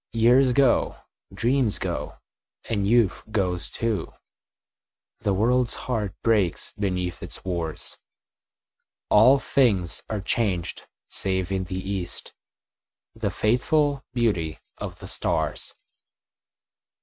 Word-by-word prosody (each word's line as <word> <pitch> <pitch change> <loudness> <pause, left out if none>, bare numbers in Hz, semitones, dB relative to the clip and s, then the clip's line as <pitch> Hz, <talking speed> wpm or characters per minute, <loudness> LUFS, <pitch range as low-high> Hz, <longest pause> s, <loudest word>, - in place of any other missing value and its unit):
Years 125 +3 +5
go, 130 0 +3 0.3
dreams 120 -2 +2
go, - - -4 0.5
and 100 -3 0
youth 115 -3 +3
goes 95 -5 -1
too, 110 -7 -2 1.1
The 105 - 0
world's 120 +4 +2
heart 110 -6 -3
breaks 105 -7 +1
beneath 90 -3 -2
its - - -6
wars, 85 -4 -3 1.1
All 125 +6 +7
things 105 -11 +2
are 110 - -2
changed, 95 -3 -1 0.2
save 95 -1 +1
in 95 -1 -1
the 90 0 -5
east 95 -3 -2 0.8
The - - -2
faithful 140 +5 +1
beauty 100 -10 0 0.2
of - - -6
the - - -9
stars. - - 0
105 Hz, 100 wpm, -25 LUFS, 95-120 Hz, 1.1 s, All